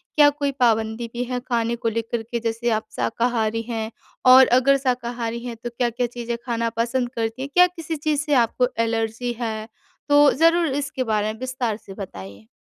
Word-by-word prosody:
क्या 295 -1 +7
कोई 285 -1 -2
पाबंदी 225 -1 +1
भी 245 +1 -2
है 250 0 -3
खाने 235 -2 -1
को 230 -1 -1
लेकर 230 +1 -3
के, 235 +1 -4
जैसे 230 +1 -2
आप 220 -1 0
शाकाहारी 225 - 0
हैं 225 -1 -3 0.4
और 260 0 +9
अगर 275 +2 +4
शाकाहारी 240 -3 -2
हैं 235 -1 -5
तो 240 - -3
क्या-क्या 240 0 -1
चीज़ें 235 0 -5
खाना 230 -1 -1
पसंद 240 +1 0
करती 225 +2 -2
हैं? 275 - -4
क्या 360 0 +7
किसी 330 -2 -6
चीज़ 300 0 0
से 300 -1 -1
आपको 250 +2 0 0.2
एलर्जी 225 +1 -2
है? 220 -2 -3 0.4
तो 290 0 +6
ज़रूर 330 +2 +3
इसके 265 -2 -3
बारे 215 0 0
में 220 - -14
विस्तार 255 -4 -2
से 195 -3 -12
बताइए। 100 - -9
235 Hz, 185 wpm, -23 LUFS, 225-260 Hz, 0.4 s, और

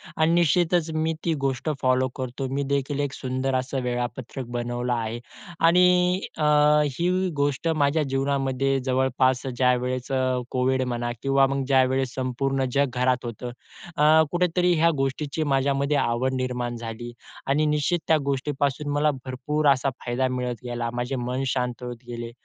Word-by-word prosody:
आणि 160 +1 +2
निश्चितच 170 0 +2
मी 160 +1 0
ती 165 - +2
गोष्ट 135 +1 -1
फॉलो 130 0 +2
करतो. 130 +1 -4
मी 140 +1 0
देखील 140 +1 -1
एक 145 -1 -1
सुंदर 130 0 -2
असं 130 +1 -1
वेळापत्रक 125 +1 -4
बनवलं 120 +1 -2
आहे 115 0 -3 0.5
आणि 180 +1 +4 0.2
अ, 155 - -1 0.5
ही 185 +2 +1
गोष्ट 145 +2 0
माझ्या 155 -1 +2
जीवनामध्ये 135 0 0
जवळपास 130 0 +1
ज्यावेळेस 125 0 +1 0.4
कोविड 130 0 +1
म्हणा 120 -1 -2
किंवा 135 +1 +3
मग 135 0 -1
ज्यावेळेस 130 -1 +2
संपूर्ण 135 +1 -1
जग 140 0 +3
घरात 125 0 +1
होतं 120 +1 -6 0.5
अ, 155 +2 +6
कुठेतरी 180 0 +2
ह्या 165 +1 +5
गोष्टीची 140 +3 -1
माझ्यामध्ये 140 +2 +1
आवड 120 +2 0
निर्माण 125 -2 -2
झाली 120 +1 -6 0.3
आणि 145 +3 +2
निश्चित 150 +3 +1
त्या 160 - +5
गोष्टीपासून 140 +1 -1
मला 150 +1 +2
भरपूर 135 +4 -1
असा 135 +1 -1 0.2
फायदा 125 +2 0
मिळत 125 -1 -2
गेला. 120 -1 -3
माझे 120 +2 -2
मन 125 +1 -2
शांत 125 -1 -2
होत 125 0 -5
गेले. 120 -1 -6
135 Hz, 145 wpm, -25 LUFS, 125-145 Hz, 0.5 s, अ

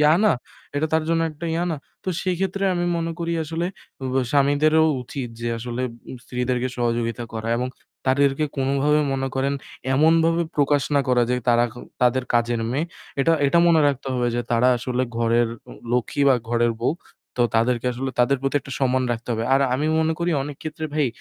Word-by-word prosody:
ইয়া 150 +1 +6
না? 215 - +5 0.4
এটা 155 - +1
তার 160 0 +3
জন্য 165 0 +2
একটা 155 +3 -7
ইয়া 170 +1 0
না? 155 - -2 0.3
তো - - -3
সেক্ষেত্রে 190 +1 -1
আমি 175 0 0
মনে 165 0 -2
করি 170 0 -2
আসলে 165 +3 -2 0.4
উব 130 0 -2 0.2
স্বামীদেরও 145 +3 +4 0.2
উচিত 125 0 -5
যে 120 - -2
আসলে 120 +2 -4 0.4
স্ত্রীদেরকে 125 0 -1
সহযোগিতা 120 0 -1
করা 110 0 -4
এবং 125 +1 -1 0.4
তাদেরকে 140 +2 +3
কোনো 135 0 0
ভাবে 150 +1 +4
মনে 135 0 -1
করেন 135 +1 0 0.4
এমনভাবে 165 +3 +4
প্রকাশ 145 -1 +3
না 140 - +5
করা 125 -1 +4
যে - - +3
তারা 120 0 +5 0.4
তাদের 125 +1 +3
কাজের 120 0 +2
মেয়ে, 145 +6 0 0.4
এটা 165 +4 +3
এটা 160 +5 +3
মনে 165 -2 +5
রাখতে 140 -1 -1
হবে 125 -1 +1
যে 120 - +1
তারা 120 +2 +4
আসলে 125 +1 -1
ঘরের 115 0 +2 0.2
উ - - -9 0.2
লক্ষ্মী 125 +3 0
বা 135 - +6
ঘরের 120 0 +2
বউ, 120 - +2 0.5
তো 125 - -1
তাদেরকে 120 +1 +2
আসলে 130 +2 -3
তাদের 130 +3 +4
প্রতি 135 +1 -1
একটা 135 - -9
সম্মান 130 0 +2
রাখতে 115 +1 -6
হবে। 115 0 -1
আর 135 - +5
আমি 145 +4 0
মনে 160 0 +2
করি 170 0 0
অনেক 145 0 -6
ক্ষেত্রে 155 0 -5
ভাই 150 -3 +2
135 Hz, 190 wpm, -23 LUFS, 125-155 Hz, 0.5 s, ইয়া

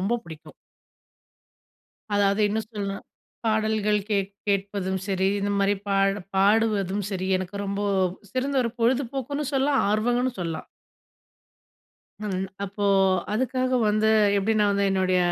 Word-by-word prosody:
ரொம்ப 200 +6 +1
பிடிக்கும்! 160 -1 -11 1.6
அதாவது 200 +1 +2
இன்னும் 220 +1 -2
சொல்லனுனா, 200 -2 -4 0.5
பாடல்கள் 215 -1 +1
கேட் 195 -1 0 0.2
கேட்பதும் 195 -1 -1
சரி, 190 -1 +1
இந்த 205 - -1
மாரி 200 +1 +3
பாட 195 0 +2 0.2
பாடுவதும் 205 -1 +2
சரி, 185 -1 -3
எனக்கு 185 +2 -6
ரொம்ப 200 +1 -2 0.5
சிறந்த 270 +2 -1
ஒரு 230 - -1
பொழுதுபோக்குன்னு 270 +4 0
சொல்லலாம், 275 +1 +2
ஆர்வங்கனு 245 +4 +1
சொல்லலாம். 165 -2 -4 1.6
ஹம். 190 -3 -2 0.2
அப்போ 200 +1 -4 0.5
அதுக்காக 255 +2 0
வந்து 215 +1 +2 0.3
எப்டி 200 +3 +1
நான் 205 -1 +3
வந்து 200 0 +1
என்னுடைய 185 -1 +2
205 Hz, 120 wpm, -25 LUFS, 195-225 Hz, 1.6 s, மாரி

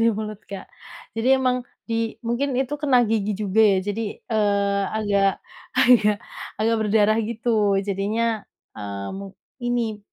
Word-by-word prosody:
Di 230 - +5
mulut 215 -1 -5
Kak. 200 -1 -8 0.5
Jadi 230 - +1
emang 250 -2 0 0.2
di 225 0 -1
mungkin 245 +3 -1
itu 265 +3 0
kena 275 -4 +4
gigi 215 -1 0
juga 205 +1 -2
ya 200 -3 +5
jadi, 205 +3 -2 0.3
eee, 200 -2 +2 0.2
agak, 200 -2 +2 0.4
agak 215 -4 +5 0.4
agak 225 +1 +2
berdarah 215 +1 +3
gitu. 220 -2 +1
Jadinya, 210 +3 -1 0.3
eee, 100 -1 -5
mung 195 0 -8 0.2
ini 240 -3 -1
215 Hz, 135 wpm, -23 LUFS, 200-230 Hz, 0.5 s, Di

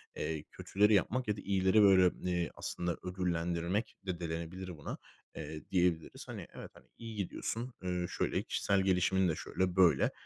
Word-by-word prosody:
eee, 80 -2 -3
kötüleri 105 +2 +2
yapmak 120 +6 +2
ya 105 -1 0
da - - -6
iyileri 95 +2 +3
böyle, 95 -3 +7 0.2
eee, 85 -2 0
aslında 85 -1 -3
ödüllendirmek 90 +2 -1
de 90 -3 -3
denilebilir 85 +2 -5
buna, - - -6 0.4
eee, 75 +1 -7
diyebiliriz. 90 -3 0
Hani, - - -7
evet, - - -9
hani, - - -18
iyi 115 -1 -7
gidiyorsun, 115 +5 -3
ııı, 90 -1 -1
şöyle, - - -1
kişisel 100 -1 +1
gelişimin 95 0 +3
de 80 - 0
şöyle, 90 +2 -2
böyle. 85 -7 +5
90 Hz, 160 wpm, -33 LUFS, 85-100 Hz, 0.4 s, böyle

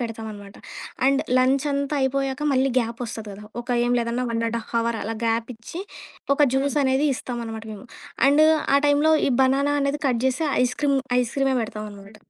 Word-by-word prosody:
పెడతామనమాట. 220 -4 -7 0.5
And 275 0 +3 0.2
lunch 260 +2 +2
అంతా 280 +1 -1
అయిపోయాక 270 +1 -1
మళ్ళీ 265 +1 +2
గ్యాప్ 230 0 -3
ఒస్తది 220 -2 -7
కదా, 205 +2 -11 0.2
ఒక 240 - -13 0.2
ఏం 245 - +1
లేదన్నా 235 +1 -1
వన్ 230 0 -1
అండ్ 235 +1 -2
హావర్ 230 0 0
అలా 225 +2 -3
గ్యాపిచ్చి, 230 +6 -3 0.5
ఒక 295 - -6
జ్యూస్ 270 0 0
అనేది 265 +3 +2
ఇస్తామనమాట 230 -3 -6
మేము. 210 +3 -10 0.4
అండ్ 290 +2 +5 0.3
ఆ 280 - +6
టైమ్‌లో 290 +2 +4 0.2
ఈ - - 0
బనానా 275 +2 +2
అనేది 280 +1 -1
కట్ 245 -3 +1
జేసి 265 +5 0 0.2
ఐస్‌క్రీమ్ 275 +3 +1 0.2
ఐస్‌క్రీమే 265 +2 0
పెడతామనమాట. 210 -1 -8
250 Hz, 160 wpm, -23 LUFS, 225-275 Hz, 0.5 s, ఆ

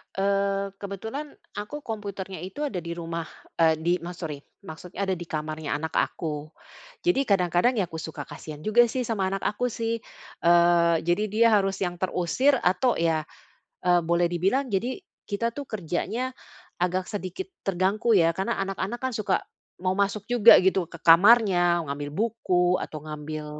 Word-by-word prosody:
Eee, 195 0 0
kebetulan 220 +9 -6 0.2
aku 255 +9 -6
komputernya 200 -4 -5
itu 190 +12 -5
ada 220 -11 -2
di 170 0 -6
rumah, 165 -1 -5 0.3
eee, 160 -1 +5
di 165 +2 0
ma 175 +2 -7
sorry, 155 -5 -5 0.2
maksudnya 180 +2 -7
ada 190 -1 0
di 175 - -7
kamarnya 155 -1 -3
anak 160 +2 -5
aku. 150 -2 -2 0.6
Jadi 350 -6 +3
kadang-kadang 185 +4 +3
ya 200 - +2
aku 160 - -6
suka 160 0 -6
kasihan 150 -1 -10
juga 235 +3 +5
sih 255 +2 -2
sama 215 -5 -1
anak 195 0 -3
aku 230 +4 0
sih. 230 -1 -2 0.5
Eee, 170 0 +5
jadi 175 +5 +1
dia 225 +3 +4
harus 195 -2 +2
yang 175 -1 -3
terusir 185 +10 +2
atau 215 +3 +2
ya, 160 -2 0 0.6
eee, 175 -1 +5
boleh 170 +1 +2
dibilang 190 +11 +1
jadi 235 - -1 0.3
kita 230 +3 -2
tuh 285 - -4
kerjanya 215 +7 -3 0.4
agak 180 +1 0
sedikit 205 - -5 0.2
terganggu 195 +5 +1
ya, 165 -4 +5
karena 190 - -1
anak-anak 195 +4 -3
kan 260 -1 -2
suka 200 -3 0 0.4
mau 185 0 0
masuk 200 +1 0
juga 240 -2 +8
gitu 190 0 +2
ke 170 - -11
kamarnya, 175 -1 +6
ngambil 145 +1 -4
buku 185 -3 +1
atau 155 - -5
ngambil, 155 0 -6
190 Hz, 160 wpm, -26 LUFS, 170-215 Hz, 0.6 s, juga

